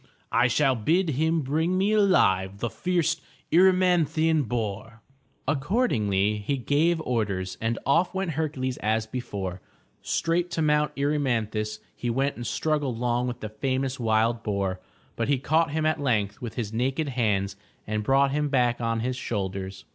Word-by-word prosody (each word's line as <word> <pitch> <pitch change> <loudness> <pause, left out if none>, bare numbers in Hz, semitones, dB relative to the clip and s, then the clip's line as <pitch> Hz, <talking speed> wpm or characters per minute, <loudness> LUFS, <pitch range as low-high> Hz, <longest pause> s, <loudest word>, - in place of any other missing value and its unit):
I 120 +1 +4
shall 135 +2 +3
bid 160 - +1
him 160 +4 +1
bring 160 +6 0
me 195 +3 +2
alive 100 - +3
the 120 +2 -3
fierce 170 -3 0 0.4
Er 180 +3 +7
y - - +7
man'thi 170 -4 +2
an 160 -2 +3
boar.'' 115 -2 -4 0.5
Accordingly 120 - +1
he 135 +7 -2
gave 155 +6 +2
orders, 100 -8 -2
and 115 +1 0
off 165 +6 +3
went 190 -2 -2
Hercules 145 -5 -2
as 110 +1 0
before. 100 -6 -5 0.4
Straight 170 +1 0
to 160 - 0
Mt. 150 -1 +2
Erymanthus 115 -7 -1
he 120 - -3
went 135 +4 0
and 120 - -6
struggled 150 -6 -1
long 120 +1 0
with 125 0 -5
the 110 - -4
famous 130 +4 -2
wild 115 0 +1
boar, 100 -4 -2 0.4
but 115 - -1
he 140 -1 +2
caught 155 +4 +2
him 155 +1 -1
at 155 -1 +1
length 105 -4 0
with 120 -3 -6
his 110 -4 -3
naked 135 +6 0
hands 105 -6 0 0.3
and 105 0 -2
brought 135 +3 +3
him 150 +1 0
back 125 -3 +1
on 115 -1 0
his 125 +2 -1
shoulders. 95 -5 -4
125 Hz, 165 wpm, -26 LUFS, 110-155 Hz, 0.5 s, Er